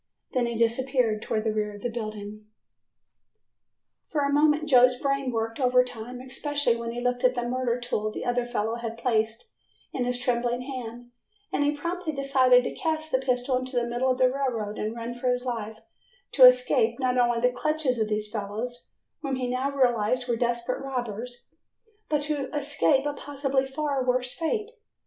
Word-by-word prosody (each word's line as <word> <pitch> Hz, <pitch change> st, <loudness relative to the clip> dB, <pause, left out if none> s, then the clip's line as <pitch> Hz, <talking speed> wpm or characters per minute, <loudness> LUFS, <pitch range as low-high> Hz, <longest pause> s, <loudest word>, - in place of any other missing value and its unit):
Then 245 Hz, -2 st, +1 dB
he 235 Hz, -1 st, -3 dB
disappeared 235 Hz, -1 st, +1 dB
towards 215 Hz, 0 st, -1 dB
the 220 Hz, -1 st, 0 dB
rear 210 Hz, -1 st, -2 dB
of 205 Hz, -, -11 dB
the 245 Hz, -, -1 dB
building. 215 Hz, -2 st, -6 dB, 1.6 s
For 300 Hz, -, -1 dB
a 280 Hz, 0 st, +1 dB
moment 300 Hz, +1 st, +3 dB
Joe's 250 Hz, -2 st, +6 dB
brain 275 Hz, 0 st, -1 dB
worked 225 Hz, 0 st, -2 dB
overtime, 250 Hz, -2 st, +1 dB
especially 285 Hz, -1 st, 0 dB
when 235 Hz, 0 st, -4 dB
he 235 Hz, +1 st, -4 dB
looked 245 Hz, 0 st, -1 dB
at 255 Hz, 0 st, +4 dB
the 240 Hz, -1 st, -2 dB
murder 250 Hz, -1 st, -1 dB
tool 215 Hz, -3 st, -1 dB
the -, -, -6 dB
other 245 Hz, 0 st, +1 dB
fellow 230 Hz, -1 st, -2 dB
had 230 Hz, -1 st, -5 dB
placed 225 Hz, -, -1 dB, 0.4 s
into 245 Hz, -1 st, -1 dB
his 250 Hz, 0 st, 0 dB
trembling 245 Hz, 0 st, 0 dB
hand 245 Hz, -2 st, -7 dB, 0.4 s
and -, -, +2 dB
he 290 Hz, +1 st, +1 dB
promptly 340 Hz, +1 st, -3 dB
decided 260 Hz, -3 st, +4 dB
to -, -, -3 dB
cast 315 Hz, -1 st, -2 dB
the 260 Hz, -, +3 dB
pistol 255 Hz, 0 st, 0 dB
into 255 Hz, 0 st, -6 dB
the 240 Hz, -1 st, +2 dB
middle 240 Hz, +2 st, 0 dB
of 255 Hz, -, +1 dB
the 255 Hz, -1 st, +5 dB
roadway 250 Hz, -6 st, -2 dB
and 215 Hz, +2 st, -3 dB
run 235 Hz, +1 st, -5 dB
for 245 Hz, +1 st, -2 dB
his 250 Hz, 0 st, 0 dB
life 220 Hz, -3 st, -4 dB, 0.5 s
to -, -, +9 dB
escape -, -, +3 dB
not 255 Hz, -2 st, +1 dB
only 240 Hz, -1 st, +3 dB
the 250 Hz, +1 st, +2 dB
clutches 300 Hz, -2 st, 0 dB
of 220 Hz, -, +1 dB
these 210 Hz, 0 st, -2 dB
fellows, 220 Hz, +3 st, -5 dB, 0.3 s
whom 275 Hz, -3 st, -2 dB
he 255 Hz, -1 st, -2 dB
now 255 Hz, +2 st, -1 dB
realized 250 Hz, -2 st, +1 dB
were 240 Hz, -, +1 dB
desperate 240 Hz, +1 st, -1 dB
robbers, 245 Hz, -2 st, -5 dB, 0.6 s
but 295 Hz, -1 st, +1 dB
to 290 Hz, -2 st, -2 dB
escape 285 Hz, -1 st, +2 dB
a 290 Hz, -, -1 dB
possibly 275 Hz, -2 st, -1 dB
far 280 Hz, -1 st, -1 dB
worse 250 Hz, 0 st, 0 dB
fate. 425 Hz, +7 st, -2 dB
250 Hz, 180 wpm, -26 LUFS, 235-275 Hz, 1.6 s, to